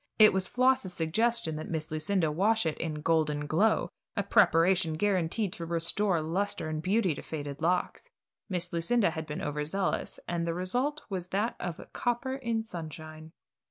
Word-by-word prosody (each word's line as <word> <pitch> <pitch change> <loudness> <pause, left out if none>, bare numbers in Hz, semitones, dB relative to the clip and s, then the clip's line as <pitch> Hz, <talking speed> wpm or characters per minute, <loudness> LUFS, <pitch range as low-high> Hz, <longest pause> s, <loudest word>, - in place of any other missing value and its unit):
It 215 -1 +8
was 190 -1 +1
Floss's 255 -6 +2
suggestion 175 +1 0
that 155 - -6
Miss 160 -1 -3
Lucinda 155 +1 +1
wash 205 +6 +2
it 155 -2 0
in 155 -2 -3
"Golden 150 -2 +1
Glow," 170 +3 +2 0.3
a 200 - +1
preparation 175 -2 +4
guaranteed 185 +2 0
to 170 - -5
restore 170 +2 +1
luster 170 0 -2
and 155 0 -3
beauty 190 0 +2
to - - -7
faded 145 -3 -6
locks. 180 +2 0 0.4
Miss 180 -2 -1
Lucinda 170 +4 +2
had 160 0 -5
been 150 - -5
over 150 0 -2
zealous, 190 +6 -2
and 170 -1 -1
the 165 - -1
result 250 - -1
was 180 -2 -3
that 205 +5 -1
of 175 -2 -4
copper 245 +2 -1
in 235 -4 -1
sunshine. 160 -4 -8
175 Hz, 165 wpm, -29 LUFS, 160-205 Hz, 0.4 s, It